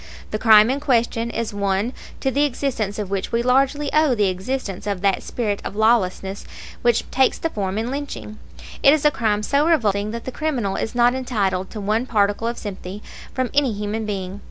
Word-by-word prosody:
The 215 - -2
crime 220 0 +7
in 275 - -1
question 235 -4 +1
is 230 -2 -3
one 200 +4 0 0.3
to 265 - +1
the 285 +2 +2
existence 250 -7 -1
of 205 -3 -4
which 195 -1 -2
we 230 0 +1
largely 275 +3 +2
owe 305 -4 +4
the 205 -3 +2
existence 195 +1 -4
of 200 -3 -2
that 195 -1 +2
spirit 210 -4 -2
of - - -6
lawlessness 200 -3 +1 0.4
which 240 -1 +3
takes 265 0 +3
form 205 -11 -2
in 230 +3 -2
lynching. 275 -6 -6 0.4
It 280 +2 +7
is 305 - -3
a 300 - +6
crime 210 -5 0
so 285 +7 +2
revolting 210 - +2
that 230 +1 -6
the 260 - -4
criminal 250 -9 -2
is 225 - -3
not 240 0 +4
entitled 200 -8 -1
to 215 - -7
one 215 +5 0
particle 205 0 +1
of 235 - -3
sympathy 200 0 -7 0.3
from 255 -2 -1
any 280 -5 +2
human 210 +2 -3
being. 195 -1 -4
225 Hz, 195 wpm, -22 LUFS, 200-260 Hz, 0.4 s, crime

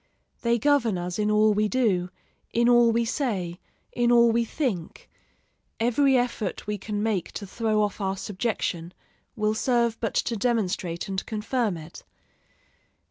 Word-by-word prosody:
They 235 0 +2
govern 240 -6 +2
us 175 +2 -4
in 210 0 +1
all 210 0 +4
we 210 +1 +2
do, 205 -7 +1 0.4
in 235 +1 +2
all 240 -1 +6
we 230 +1 +1
say, 195 - -2 0.3
in 240 0 +2
all 235 -1 +6
we 235 +1 +2
think; 225 - -3 0.7
every 255 +4 +3
effort 240 -5 -2
we 210 -1 -3
can 205 +1 -3
make 210 -6 -1
to 205 - -6
throw 215 +1 0
off 205 0 -3
our 195 0 -1
subjection 185 -4 -3 0.4
will 215 -2 +1
serve 235 0 +1
but 225 - -3
to 235 - 0
demonstrate 195 -7 -1
and 190 -1 -3
confirm 220 -2 -1
it. 160 +1 -11
215 Hz, 150 wpm, -26 LUFS, 195-235 Hz, 0.7 s, all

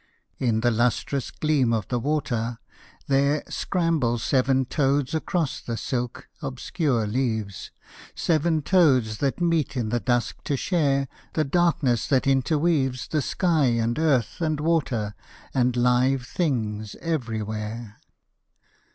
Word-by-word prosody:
In 115 -4 +1
the 120 +1 +3
lustrous 120 +3 0
gleam 145 -6 +1
of 110 -4 -1
the 125 - 0
water, 120 -4 -1 0.5
there 140 +2 +2
Scramble 165 -10 0
seven 130 +2 +2
toads 140 +1 +1
across 160 -1 -1
the 115 -1 -4
silk, 125 -1 -3
obscure 135 - -1
leaves, 110 -4 -2 0.5
Seven 160 -1 +1
toads 130 - +3
that 140 +2 0
meet 165 -5 +1
in 115 -3 -1
the 120 +2 0
dusk 120 0 -1
to 140 - 0
share 140 -5 +1 0.3
The 155 - +2
darkness 155 -6 +1
that 135 -3 +2
interweaves 135 -2 +1
The 155 - +1
sky 165 0 +1
and 115 +1 +1
earth 145 - +1
and 155 -2 0
water 140 -10 0 0.4
and 125 -1 +2
live 125 +1 +2
things 110 - -2
everywhere. 110 -6 -4
130 Hz, 125 wpm, -25 LUFS, 120-155 Hz, 0.5 s, the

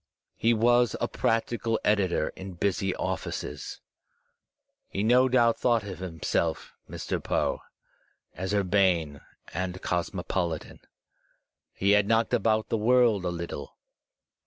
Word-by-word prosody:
He 115 - +2
was 120 0 +3
a - - 0
practical 115 0 0
editor 95 -6 +1
in 95 0 -9
busy 95 +1 -1
offices. - - -4 1.1
He 100 - -2
no 125 +3 +4
doubt 120 -2 +3
thought 120 -3 +2
of 95 -4 -7
himself, 80 -2 -2 0.2
Mr. - - -4
Poe, - - 0 0.7
as 95 +1 -4
urbane 90 -7 +1 0.3
and 95 +1 -3
cosmopolitan. 90 -1 -2 0.9
He 100 +1 +1
had 105 -1 +4
knocked 115 +1 +2
about 110 -1 +1
the 115 - +1
world 115 -3 +3
a 90 - 0
Uttle. 85 -4 -6
100 Hz, 115 wpm, -27 LUFS, 90-115 Hz, 1.1 s, no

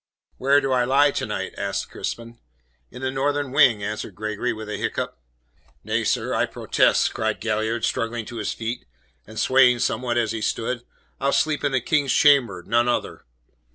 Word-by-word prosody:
"Where 140 +2 +4
do 135 - -1
I 125 -1 +3
lie 140 +3 +4
to - - -3
night?" - - -4
asked - - -3
Crispin. 115 0 -6 0.5
"In 125 - -10
the 130 - 0
northern 140 0 -1
wing," 130 -7 +4
answered 105 +1 -5
Gregory 110 +3 -2
with 110 -1 -7
a 105 - -4
hiccough. - - -2 0.7
"Nay, - - -1
sir, - - 0
I - - +1
protest," - - +2
cried 110 -1 -1
Galliard, 110 +1 -1
struggling 115 0 -2
to 120 - -8
his 110 - -2
feet, 115 - -5 0.4
and 110 +1 -7
swaying 130 -2 +5
somewhat 120 0 -1
as 115 -2 +1
he 115 -1 -4
stood. 120 +3 -2 0.4
"I'll 140 +1 +1
sleep 150 +2 +1
in 145 - +1
the 130 -1 +1
King's 145 0 +1
chamber, 125 -11 +4
none 120 +2 +2
other." 120 - -2
120 Hz, 180 wpm, -23 LUFS, 110-135 Hz, 0.7 s, swaying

